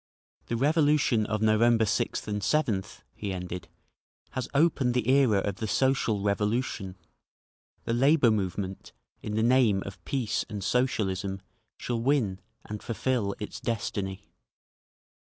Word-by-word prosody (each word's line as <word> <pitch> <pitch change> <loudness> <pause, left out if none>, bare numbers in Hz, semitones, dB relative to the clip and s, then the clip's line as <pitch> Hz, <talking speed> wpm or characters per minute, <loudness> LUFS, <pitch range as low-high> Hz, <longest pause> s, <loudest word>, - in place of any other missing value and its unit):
"The 115 - -1
revolution 145 -5 +3
of 110 0 -1
November 110 +1 +4
6th 110 - -1
and 105 -1 -2
7th," 105 -7 -1
he 100 -2 -5
ended, 90 -2 -5 0.6
"has 130 - -4
opened 140 -4 +2
the 125 -2 0
era 130 -7 +4
of 100 -1 -3
the 110 - -3
Social 120 -4 +1
Revolution…. 105 -1 -1 0.9
The 115 - -1
labour 135 0 +4
movement, 95 -2 -3 0.3
in 105 - -4
the 110 - +1
name 115 -5 +4
of 95 -2 -9
peace 125 -6 -1
and 105 -2 -5
Socialism, 95 -4 0 0.4
shall 120 -2 -3
win, 115 -8 +1 0.3
and 105 0 -6
fulfil 115 -3 -1
its 105 - -6
destiny…." 100 -4 -3
110 Hz, 130 wpm, -28 LUFS, 100-125 Hz, 0.9 s, November